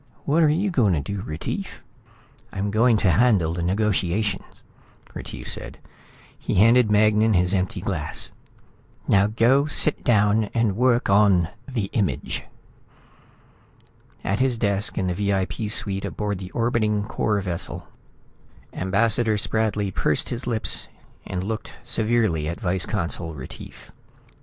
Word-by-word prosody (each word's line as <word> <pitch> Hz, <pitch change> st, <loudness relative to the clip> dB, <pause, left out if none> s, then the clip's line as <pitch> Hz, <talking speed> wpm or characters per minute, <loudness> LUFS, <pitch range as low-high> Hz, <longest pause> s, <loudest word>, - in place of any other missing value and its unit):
"What 155 Hz, +4 st, +2 dB
are 155 Hz, -, +5 dB
you 185 Hz, +6 st, +1 dB
going 115 Hz, -, +2 dB
to 80 Hz, -, +1 dB
do, 100 Hz, +8 st, -4 dB
Retief?" 75 Hz, -2 st, -6 dB, 0.7 s
"I'm 100 Hz, +1 st, -3 dB
going 115 Hz, +2 st, +3 dB
to 90 Hz, -, +5 dB
handle 90 Hz, -4 st, +3 dB
the 85 Hz, -, -4 dB
negotiation," 100 Hz, +1 st, 0 dB, 0.7 s
Retief -, -, -8 dB
said. -, -, -2 dB, 0.6 s
He -, -, -3 dB
handed 115 Hz, +3 st, +5 dB
Magnan 105 Hz, +1 st, +3 dB
his 90 Hz, +1 st, +2 dB
empty 95 Hz, +1 st, -1 dB
glass. 80 Hz, -6 st, -3 dB, 0.8 s
"Now 100 Hz, 0 st, +4 dB
go 120 Hz, +7 st, +3 dB
sit 150 Hz, 0 st, +3 dB
down 105 Hz, -1 st, +3 dB
and 115 Hz, -4 st, +1 dB
work 125 Hz, +1 st, +2 dB
on 100 Hz, -5 st, +4 dB, 0.2 s
the 120 Hz, -7 st, -2 dB
Image." 100 Hz, -5 st, -1 dB, 1.8 s
At 100 Hz, +3 st, -1 dB
his 130 Hz, -2 st, +1 dB
desk 100 Hz, -1 st, -1 dB
in 95 Hz, -, 0 dB
the 90 Hz, -, 0 dB
VIP 100 Hz, +2 st, -1 dB
suite 100 Hz, -2 st, -1 dB
aboard 105 Hz, -3 st, -3 dB
the 95 Hz, -1 st, -7 dB
orbiting 110 Hz, -3 st, 0 dB
Corps 105 Hz, -1 st, -1 dB
vessel, 90 Hz, -3 st, -3 dB, 0.9 s
Ambassador 110 Hz, +3 st, +1 dB
Spradley 105 Hz, -2 st, -1 dB
pursed -, -, 0 dB
his 120 Hz, +1 st, -5 dB
lips 115 Hz, -3 st, 0 dB, 0.4 s
and 90 Hz, -1 st, -3 dB
looked 110 Hz, +3 st, -5 dB
severely 110 Hz, -9 st, 0 dB
at 85 Hz, -, -5 dB
Vice 95 Hz, -2 st, 0 dB
Consul 85 Hz, -5 st, -2 dB
Retief. 65 Hz, -3 st, -11 dB
105 Hz, 135 wpm, -23 LUFS, 95-115 Hz, 1.8 s, are